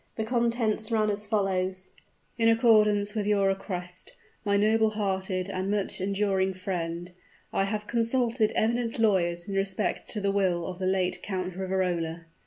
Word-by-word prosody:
The 220 - -2
contents 230 -2 0
ran 215 -2 +2
as 205 +1 -4
follows: 190 -3 -1 0.5
"In 230 -1 +3
accordance 215 -3 +4
with 210 -2 -2
your 200 -2 +3
request, 180 -2 -5 0.3
my 200 -1 +2
noble 220 +2 +3
hearted 190 -3 -2
and 190 0 -3
much 205 -2 -1
enduring 195 -1 0
friend, 175 -2 -4 0.4
I 195 - +2
have 210 +1 -3
consulted 230 0 +1
eminent 235 +1 0
lawyers 175 -6 +1
in 200 - -4
respect 195 -1 -1
to 215 - -3
the 200 -1 +1
will 185 -4 +1
of 185 -1 -6
the 185 - -1
late 185 -1 0
Count 185 -2 -3
of 185 - -11
Riverola. 175 -3 -1
200 Hz, 160 wpm, -28 LUFS, 185-215 Hz, 0.5 s, accordance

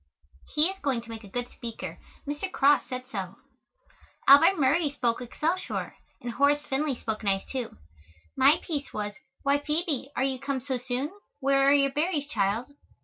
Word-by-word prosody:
He 300 +1 +5
is 385 +1 -5
going 270 -8 0
to 230 - -11
make 225 0 -7
a - - -10
good 245 +4 -4
speaker. 230 -3 -7 0.3
Mr. 295 +6 -3
Cross 285 -3 +4
said 255 -1 -4
so. 195 -2 -4 0.9
Albert 305 +8 +8
Murray 290 +3 +3
spoke 250 -4 -1
"Excelsior," 320 +9 -2 0.3
and 240 - -5
Horace 290 +3 +2
Finley 280 0 0
spoke 220 -2 -4
nice, 195 -1 +1
too. 255 -4 -5 0.6
My 275 +4 +5
piece 290 -4 -4
was, 210 -1 -3 0.3
"Why, 280 0 +3
Phoebe, 300 -2 -1
are - - +1
you 265 -1 0
come 275 0 -2
so 260 0 -3
soon? 255 +4 -2 0.3
Where 275 0 +4
are - - +6
your 275 -1 +4
berries, 300 0 0
child?" 220 +3 0
275 Hz, 170 wpm, -28 LUFS, 245-290 Hz, 0.9 s, Albert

